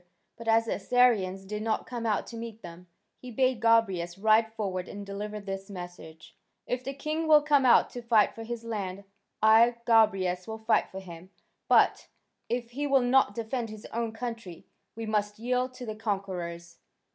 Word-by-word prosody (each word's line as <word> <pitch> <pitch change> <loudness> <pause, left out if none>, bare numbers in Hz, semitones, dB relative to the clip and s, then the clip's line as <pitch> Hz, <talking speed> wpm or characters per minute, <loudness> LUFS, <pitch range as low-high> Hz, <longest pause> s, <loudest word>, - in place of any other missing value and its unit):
But 230 - -11
as 225 0 +4
the - - -1
Assyrians 200 -4 +2
did 210 +2 -5
not 220 0 -1
come 235 -2 -4
out 215 - 0
to 235 - -10
meet 230 -1 -8
them, 175 +1 -11 0.3
he 255 - -10
bade 255 -1 +1
Gobryas 195 -7 +2
ride 220 +2 +3
forward 190 -4 -4
and 205 0 -8
deliver 210 +2 -5
this 195 -1 -6
message: 175 -4 -10 0.3
"If 250 0 -3
the 275 +1 -5
king 310 +3 -3
will 300 -1 +6
come 285 -3 +3
out 240 - +5
to 245 - -7
fight 230 -3 +3
for 225 - -9
his 230 0 -6
land, 200 -4 -4 0.4
I, 225 +2 +6
Gobryas, 195 -6 +3
will 220 0 -5
fight 220 +1 +1
for 190 - -8
him, 175 0 -11 0.4
but, - - +3 0.4
if 240 -1 -3
he 290 +4 -2
will 270 -2 +3
not 245 -4 +3
defend 230 0 -3
his 215 0 -10
own 230 0 -2
country, 225 -6 -7 0.3
we 225 0 -5
must 210 -1 -1
yield 250 +2 -1
to 255 -1 -8
the 215 -2 -5
conquerors." 180 -5 -4
220 Hz, 180 wpm, -28 LUFS, 195-240 Hz, 0.4 s, will